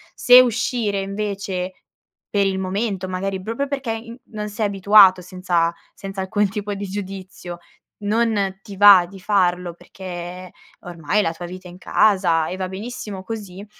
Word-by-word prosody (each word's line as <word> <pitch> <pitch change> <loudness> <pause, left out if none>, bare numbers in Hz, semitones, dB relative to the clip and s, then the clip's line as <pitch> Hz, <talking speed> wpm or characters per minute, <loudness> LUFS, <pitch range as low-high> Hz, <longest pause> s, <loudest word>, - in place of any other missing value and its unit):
Se 250 0 +8
uscire, 230 -4 0
invece, 195 -2 -4 0.6
per 200 -1 +2
il 190 -1 -1
momento 190 0 -2
magari 190 +1 -3
proprio 230 +8 -3
perché 270 -4 -3
in 230 +2 -7
non 210 -1 -5
sei 210 +1 -2
abituato 195 -1 +6
senza 175 -2 -1 0.2
senza 195 -1 -6
alcun 205 +1 0
tipo 205 0 -4
di 200 0 -5
giudizio, 190 -3 -7 0.4
non 205 -3 0
ti 200 -2 -11
va 200 -3 +8
di 195 - -12
farlo 180 -3 +1
perché 180 0 -9 0.3
ormai 175 +3 -1
la 165 -4 -1
tua 170 +1 -8
vita 185 +1 -9
è - - -11
in 175 - -13
casa 185 -5 +2
e 185 - -5
va 185 -1 -3
benissimo 200 -1 -7
così, 200 -3 -7
195 Hz, 155 wpm, -21 LUFS, 185-210 Hz, 0.6 s, Se